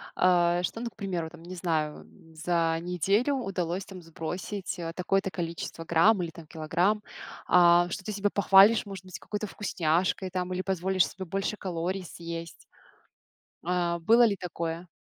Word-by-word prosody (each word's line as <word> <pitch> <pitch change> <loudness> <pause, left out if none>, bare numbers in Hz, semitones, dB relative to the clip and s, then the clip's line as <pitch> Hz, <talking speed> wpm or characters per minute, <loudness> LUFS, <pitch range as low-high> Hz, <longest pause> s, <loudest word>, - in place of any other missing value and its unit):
А 175 -1 +3
что, 225 - -3
ну, 235 - -3
к - - -33
примеру, 180 -6 -3
там, 170 -1 -14
не 180 +2 -8
знаю, 160 -4 -1
м, 160 0 -19
за 165 0 +1
неделю 195 - +1
удалось 190 -6 -2
там 185 -2 -10
сбросить, 180 +4 -5
э, 165 -1 -4
такое-то 195 +1 0
количество 170 -1 -5
грамм 175 +5 +4
или 170 - -2
там 165 -1 -12
килограмм. 170 +7 0 0.5
А 175 0 +6
что, 195 - -5
ты 215 - -4
себя 205 0 0
похвалишь, 200 +3 +6
может 195 -2 -8
быть, 185 - -8
какой-то 210 0 -4
вкусняшкой 185 -1 0
там 185 0 -3
или 185 - -1
позволишь 190 0 +1
себе 190 +1 -8
больше 195 +4 -2
калорий 185 +1 -3
съесть? 170 -1 -8 1.0
А 175 -1 0
было 230 +8 +5
ли 205 - +2
такое? 170 -2 -5
180 Hz, 165 wpm, -28 LUFS, 170-195 Hz, 1.0 s, А